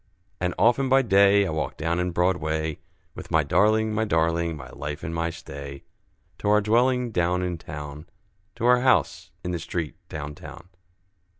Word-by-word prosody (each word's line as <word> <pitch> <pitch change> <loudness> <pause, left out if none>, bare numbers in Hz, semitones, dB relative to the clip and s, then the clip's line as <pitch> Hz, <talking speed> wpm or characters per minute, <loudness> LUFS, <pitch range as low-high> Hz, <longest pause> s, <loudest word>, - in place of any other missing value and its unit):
And 90 -1 -1
often 125 +3 +3
by 135 +1 +5
day, 100 -2 +5
I 90 - -2
walk 80 -1 -3
down 85 +2 -1
in 90 0 0
Broadway, 80 -3 0 0.3
With - - -9
my - - +3
darling, 110 +1 +2
my 110 +1 +1
darling, 85 -3 0
my 65 -3 -10
life 75 +1 -6
and 85 - -4
my 85 0 -1
stay, 70 -4 -9 0.6
To 105 - -1
our 105 0 +5
dwelling 120 +3 +2
down 90 -1 +1
in 90 -2 -3
town, 75 +2 -8 0.5
To 115 - -3
our 125 0 +6
house 130 -9 +2
in 90 - -3
the 85 - -2
street 80 -2 -4
down 75 -1 -6
town. 85 +4 -12
90 Hz, 175 wpm, -25 LUFS, 80-105 Hz, 0.6 s, our